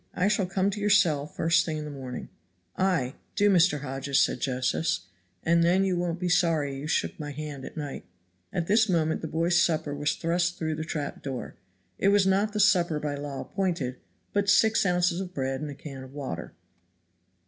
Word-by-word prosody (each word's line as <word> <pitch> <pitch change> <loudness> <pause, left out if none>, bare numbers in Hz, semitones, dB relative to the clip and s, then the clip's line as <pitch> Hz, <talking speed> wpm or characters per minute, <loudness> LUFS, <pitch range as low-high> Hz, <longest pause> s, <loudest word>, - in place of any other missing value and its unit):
I 180 - +2
shall 200 -3 +1
come 190 +2 +1
to 205 - -5
your 205 - +1
cell 160 -8 +3
the - - -22
first 165 +2 +3
thing 160 -3 -3
in 150 - -5
the 150 - -6
morning." 130 -3 -7 0.5
"Ay, 170 -9 +1 0.2
do, 205 0 +4
Mr. 170 -5 +4
Hodges," 135 0 -1
said - - +2
Josephs, 130 - 0 0.4
"and 170 0 +3
then 180 +3 +4
you 190 -2 +1
won't 175 -1 -2
be 180 - -1
sorry 165 -5 +2
you 140 +2 -6
shook - - +1
hands 145 -2 -6
at - - -11
night." 145 -3 -5 0.5
At 170 - -1
this 215 +3 +3
moment 160 -3 +1
the 160 - -3
boy's 170 +2 +2
supper 155 -4 +1
was 145 +1 0
thrust 170 +1 0
through 160 -1 -2
the 155 +1 -3
trap 150 -2 -4
door; 135 -3 -5 0.5
it - - +2
was 200 -1 +5
not 195 +3 +2
the 210 - -3
supper 180 -6 +4
by 150 -1 -2
law 145 -1 -5
appointed, 170 -10 -2 0.4
but 200 0 +1
six 220 0 +4
ounces 180 0 +2
of 180 -1 -7
bread 135 -1 -2
and 150 - -4
a 140 - -7
can 135 -2 -9
of 130 +1 -12
water. 130 - -5
165 Hz, 205 wpm, -27 LUFS, 145-185 Hz, 0.5 s, was